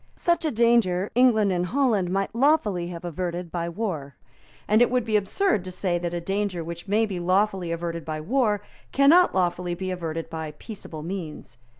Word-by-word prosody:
Such 340 Hz, -1 st, +1 dB
a -, -, +2 dB
danger 220 Hz, -5 st, +2 dB
England 220 Hz, -5 st, +4 dB
and 180 Hz, 0 st, 0 dB
Holland 230 Hz, -7 st, +1 dB
might 195 Hz, +2 st, -1 dB
lawfully 230 Hz, -, +2 dB
have 175 Hz, 0 st, -7 dB
averted 175 Hz, 0 st, -4 dB
by 170 Hz, -1 st, -2 dB
war; 165 Hz, -, -4 dB, 0.5 s
and 215 Hz, +2 st, +4 dB
it 245 Hz, -, +5 dB
would 250 Hz, -2 st, 0 dB
be 220 Hz, -2 st, 0 dB
absurd 210 Hz, -, +1 dB
to 185 Hz, -, -6 dB
say 180 Hz, -1 st, -1 dB
that 175 Hz, 0 st, -3 dB
a 175 Hz, -, -2 dB
danger 195 Hz, 0 st, -2 dB
which 170 Hz, +3 st, -7 dB
may 215 Hz, +3 st, +2 dB
be 195 Hz, -4 st, -4 dB
lawfully 185 Hz, 0 st, +1 dB
averted 170 Hz, 0 st, -3 dB
by 155 Hz, -1 st, -4 dB
war 210 Hz, -, +1 dB, 0.3 s
cannot 305 Hz, -, +5 dB
lawfully 175 Hz, -1 st, 0 dB
be 185 Hz, +1 st, -4 dB
averted 165 Hz, -2 st, -4 dB
by 160 Hz, -2 st, -6 dB
peaceable 165 Hz, -8 st, -9 dB
means. 160 Hz, -9 st, -7 dB
185 Hz, 185 wpm, -25 LUFS, 170-220 Hz, 0.5 s, it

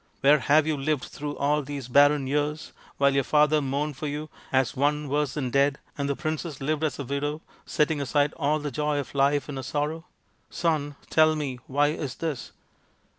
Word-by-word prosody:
Where 145 Hz, +2 st, +6 dB
have 150 Hz, +3 st, +4 dB
you 155 Hz, -1 st, 0 dB
lived 140 Hz, 0 st, -1 dB
through 145 Hz, 0 st, -6 dB
all 150 Hz, +2 st, +1 dB
these 140 Hz, -2 st, -6 dB
barren 145 Hz, +2 st, +5 dB
years 150 Hz, +3 st, -2 dB, 0.2 s
while 140 Hz, 0 st, +4 dB
your 140 Hz, 0 st, +2 dB
father 150 Hz, +1 st, +3 dB
mourned 140 Hz, +1 st, -2 dB
for 150 Hz, -, -4 dB
you 150 Hz, +1 st, -5 dB, 0.2 s
as 130 Hz, -1 st, +1 dB
one 150 Hz, +2 st, +1 dB
worse 145 Hz, -1 st, 0 dB
than 130 Hz, -5 st, -2 dB
dead, 140 Hz, +1 st, +3 dB, 0.2 s
and 140 Hz, -1 st, -2 dB
the 140 Hz, -, 0 dB
princess 155 Hz, -2 st, -4 dB
lived 155 Hz, +3 st, -1 dB
as 155 Hz, -, 0 dB
a 140 Hz, -, -4 dB
widow, 145 Hz, +3 st, -3 dB, 0.3 s
setting 150 Hz, -1 st, +1 dB
aside 145 Hz, +2 st, +1 dB
all 150 Hz, 0 st, +1 dB
the 145 Hz, -1 st, -4 dB
joy 150 Hz, +2 st, -1 dB
of 140 Hz, -, -4 dB
life 140 Hz, +1 st, +2 dB
in 145 Hz, -2 st, -5 dB
her -, -, -3 dB
sorrow? 150 Hz, +5 st, -3 dB, 0.4 s
Son! 150 Hz, -4 st, -1 dB, 0.2 s
tell 155 Hz, 0 st, +5 dB
me, 140 Hz, -5 st, -3 dB
why 145 Hz, +2 st, +2 dB
is 150 Hz, -4 st, -4 dB
this 155 Hz, -7 st, -4 dB
145 Hz, 195 wpm, -26 LUFS, 140-150 Hz, 0.4 s, Where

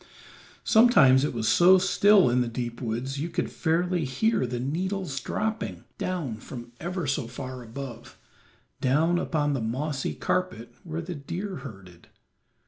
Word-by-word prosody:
Sometimes 155 Hz, -, +6 dB
it 150 Hz, -, 0 dB
was 115 Hz, -2 st, -2 dB
so 185 Hz, +2 st, +6 dB
still 195 Hz, 0 st, +5 dB
in 125 Hz, +1 st, +2 dB
the 120 Hz, -, 0 dB
deep 120 Hz, 0 st, -5 dB
woods 125 Hz, +4 st, -3 dB
you 160 Hz, +4 st, -2 dB
could -, -, -2 dB
fairly 175 Hz, +1 st, 0 dB
hear 130 Hz, -, +1 dB
the 120 Hz, 0 st, -3 dB
needles 175 Hz, +2 st, -2 dB
dropping 215 Hz, -, -3 dB, 0.2 s
down 160 Hz, -12 st, -3 dB
from 120 Hz, +1 st, -9 dB
ever 175 Hz, 0 st, -3 dB
so 135 Hz, -2 st, -1 dB
far 130 Hz, +1 st, -7 dB
above, 120 Hz, 0 st, -9 dB, 0.6 s
down 160 Hz, +7 st, +2 dB
upon 145 Hz, -4 st, 0 dB
the 135 Hz, -, -1 dB
mossy 130 Hz, +5 st, -2 dB
carpet 120 Hz, -11 st, -2 dB
where 165 Hz, -1 st, -5 dB
the 175 Hz, +2 st, -5 dB
deer 175 Hz, +6 st, -5 dB
herded. 95 Hz, -, -11 dB
140 Hz, 145 wpm, -26 LUFS, 125-180 Hz, 0.6 s, Sometimes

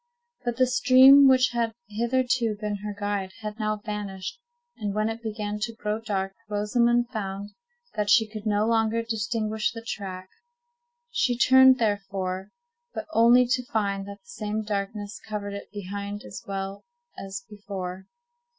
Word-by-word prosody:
But 240 Hz, -1 st, -2 dB
the 255 Hz, -, +5 dB
stream, 260 Hz, +2 st, +7 dB
which 255 Hz, -2 st, +5 dB
had 230 Hz, -2 st, -1 dB
hitherto 235 Hz, 0 st, 0 dB
been 210 Hz, -1 st, -2 dB
her 205 Hz, +1 st, -6 dB
guide, 200 Hz, -2 st, -2 dB
had 210 Hz, +1 st, -6 dB
now 215 Hz, 0 st, 0 dB
vanished; 210 Hz, -, -5 dB, 0.4 s
and 205 Hz, -2 st, -3 dB
when 215 Hz, +1 st, +1 dB
it 225 Hz, +1 st, -5 dB
began 210 Hz, -2 st, -4 dB
to 225 Hz, +2 st, -3 dB
grow 210 Hz, 0 st, -2 dB
dark, 195 Hz, -3 st, -2 dB, 0.2 s
Rosamond 235 Hz, +3 st, +2 dB
found 200 Hz, -3 st, -5 dB, 0.4 s
that 210 Hz, -1 st, -1 dB
she 220 Hz, 0 st, +5 dB
could 215 Hz, 0 st, -7 dB
no 210 Hz, 0 st, +2 dB
longer 225 Hz, 0 st, +2 dB
distinguish 220 Hz, -1 st, -1 dB
the 230 Hz, 0 st, -9 dB
track. 185 Hz, -4 st, -5 dB, 0.8 s
She 245 Hz, -, +1 dB
turned, 260 Hz, +1 st, +7 dB
therefore, 195 Hz, -4 st, -2 dB, 0.5 s
but -, -, -4 dB
only 240 Hz, +1 st, +6 dB
to 250 Hz, 0 st, +1 dB
find 200 Hz, -4 st, -1 dB
that 200 Hz, 0 st, -9 dB
the -, -, -31 dB
same 215 Hz, -8 st, -3 dB
darkness 205 Hz, 0 st, -4 dB
covered 205 Hz, -2 st, -4 dB
it 200 Hz, -, -7 dB
behind 205 Hz, +1 st, -5 dB
as -, -, -8 dB
well 195 Hz, 0 st, -4 dB, 0.4 s
as 195 Hz, +4 st, -6 dB
before. 190 Hz, -3 st, -7 dB
210 Hz, 150 wpm, -26 LUFS, 200-230 Hz, 0.8 s, stream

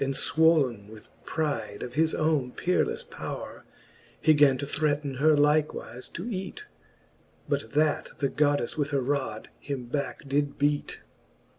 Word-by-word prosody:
And 135 Hz, 0 st, -1 dB
fwolne 140 Hz, -12 st, +2 dB
with 110 Hz, -1 st, -13 dB, 0.2 s
pride 150 Hz, -9 st, -2 dB
of 120 Hz, -, -6 dB
his 160 Hz, +3 st, +2 dB
owne 155 Hz, -6 st, +1 dB
peerelefle 450 Hz, -, 0 dB
powre, -, -, -6 dB, 0.6 s
He 155 Hz, -, +5 dB
gan 145 Hz, -3 st, +5 dB
to 140 Hz, -, -3 dB
threaten 145 Hz, -1 st, -1 dB
her 155 Hz, 0 st, +5 dB
likewife 150 Hz, -4 st, +1 dB
to 180 Hz, +7 st, -5 dB
eat 190 Hz, -5 st, -4 dB
j -, -, -9 dB, 0.9 s
But 110 Hz, -, -2 dB
that 150 Hz, 0 st, +2 dB
the 140 Hz, -, +1 dB
Goddefle 145 Hz, -1 st, +1 dB
with 145 Hz, 0 st, +1 dB
her 140 Hz, -, +1 dB
rod 130 Hz, -5 st, -2 dB
him 140 Hz, -4 st, -5 dB
backe 140 Hz, +3 st, -4 dB
did 145 Hz, +1 st, 0 dB
beat. 145 Hz, 0 st, 0 dB
145 Hz, 150 wpm, -27 LUFS, 135-155 Hz, 0.9 s, He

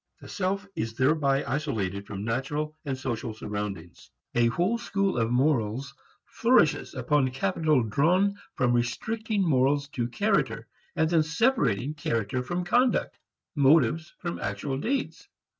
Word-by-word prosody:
The -, -, -12 dB
self 195 Hz, +1 st, -2 dB
is 115 Hz, 0 st, -3 dB
thereby 140 Hz, +1 st, +2 dB
isolated 110 Hz, -9 st, -2 dB
from 100 Hz, +1 st, -5 dB
natural 145 Hz, +6 st, -2 dB
and 135 Hz, -2 st, -2 dB
social 120 Hz, -3 st, -4 dB
surroundings. 105 Hz, -5 st, -6 dB, 0.2 s
A 120 Hz, -1 st, +3 dB
whole 180 Hz, -, 0 dB
school 200 Hz, -3 st, 0 dB
of 115 Hz, 0 st, +1 dB
morals 125 Hz, -1 st, 0 dB, 0.3 s
flourishes 225 Hz, -, +2 dB
upon 130 Hz, +1 st, +1 dB
capital 135 Hz, +3 st, +1 dB
drawn 180 Hz, -, +2 dB, 0.2 s
from 125 Hz, -1 st, +2 dB
restricting 205 Hz, -, -1 dB
morals 140 Hz, 0 st, +2 dB
to 120 Hz, -5 st, -2 dB
character 205 Hz, -, 0 dB, 0.3 s
and 160 Hz, -, +2 dB
then 165 Hz, -1 st, +3 dB
separating 155 Hz, -, +1 dB
character 115 Hz, -5 st, -2 dB
from 175 Hz, +7 st, -3 dB
conduct, 245 Hz, +7 st, +1 dB, 0.4 s
motives 155 Hz, +3 st, +3 dB
from 175 Hz, -1 st, -5 dB
actual 115 Hz, +8 st, -3 dB
deeds. 265 Hz, -, -2 dB
140 Hz, 130 wpm, -27 LUFS, 120-175 Hz, 0.4 s, A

